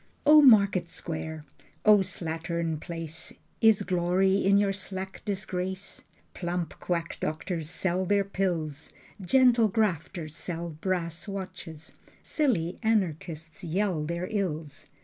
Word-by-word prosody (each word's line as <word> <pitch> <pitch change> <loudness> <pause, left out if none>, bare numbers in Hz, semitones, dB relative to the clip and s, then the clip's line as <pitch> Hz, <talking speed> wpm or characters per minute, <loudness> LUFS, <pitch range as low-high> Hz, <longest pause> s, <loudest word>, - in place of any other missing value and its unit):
O 300 +1 +9
market 200 - +6
square, 160 -2 -5 0.4
O 210 -1 +8
slattern 165 -3 -2
place, 165 -2 -6 0.3
Is 220 -3 +5
glory 185 +1 +2
in 200 +1 +5
your 200 -1 +2
slack 190 0 -6
disgrace? 190 -1 -3 0.3
Plump 175 -1 -3
quack 170 -1 -2
doctors 160 0 -3
sell 185 +1 0
their 200 +1 +3
pills, 170 -6 -2 0.3
Gentle 240 +3 +5
grafters 185 -6 -1
sell 170 0 -4
brass 170 +2 -3
watches, 185 -5 -7 0.3
Silly 195 - 0
anarchists 165 -8 -1
yell 175 -1 0
their 170 +3 -3
ills. 165 -8 -3
180 Hz, 110 wpm, -28 LUFS, 165-200 Hz, 0.4 s, O